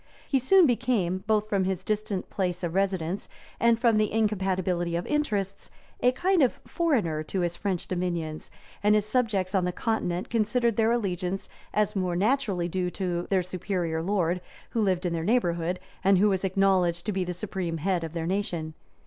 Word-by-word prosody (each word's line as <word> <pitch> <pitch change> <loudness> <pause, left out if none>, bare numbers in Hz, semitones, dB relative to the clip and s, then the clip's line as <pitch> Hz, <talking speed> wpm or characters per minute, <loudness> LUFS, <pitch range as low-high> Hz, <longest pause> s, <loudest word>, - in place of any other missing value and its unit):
He 270 - +2
soon 365 +8 +6
became, 225 - +1
both 215 -1 +2
from 200 -3 +1
his 190 -1 -2
distant 210 -2 -2
place 180 -2 -2
of 170 -1 -2
residence 190 -1 -1 0.3
and 235 -1 +4
from 230 -2 +4
the 215 -1 +2
incompatibility 190 -5 0
of 170 - -2
interests, 205 -10 -1 0.3
a 250 - +4
kind 365 +6 +2
of 255 - +2
foreigner 225 - 0
to 190 +3 -2
his 175 -1 -1
French 185 -2 -2
dominions; 170 -4 -3 0.3
and 210 +1 +4
his 210 -1 +2
subjects 215 -5 0
on 190 -2 +2
the 180 - 0
continent 180 -4 -2
considered 235 0 +1
their 225 +1 +3
allegiance 190 -4 -2 0.2
as 210 0 +1
more 185 -2 0
naturally 200 -3 +1
due 180 +1 -1
to 175 -2 -3
their 190 -2 +2
superior 175 -2 -2
lord, 180 -1 0 0.3
who 230 - 0
lived 185 -3 +1
in 175 - 0
their 165 -1 -2
neighborhood, 175 -5 +1 0.2
and 195 0 +5
who 205 +3 +4
was 190 -1 0
acknowledged 185 -3 +2
to 210 - 0
be 190 -2 -1
the 180 - -3
supreme 180 -2 -3
head 175 +1 0
of 160 -1 -5
their 165 -1 -3
nation. 170 -4 -2
190 Hz, 185 wpm, -27 LUFS, 175-215 Hz, 0.3 s, soon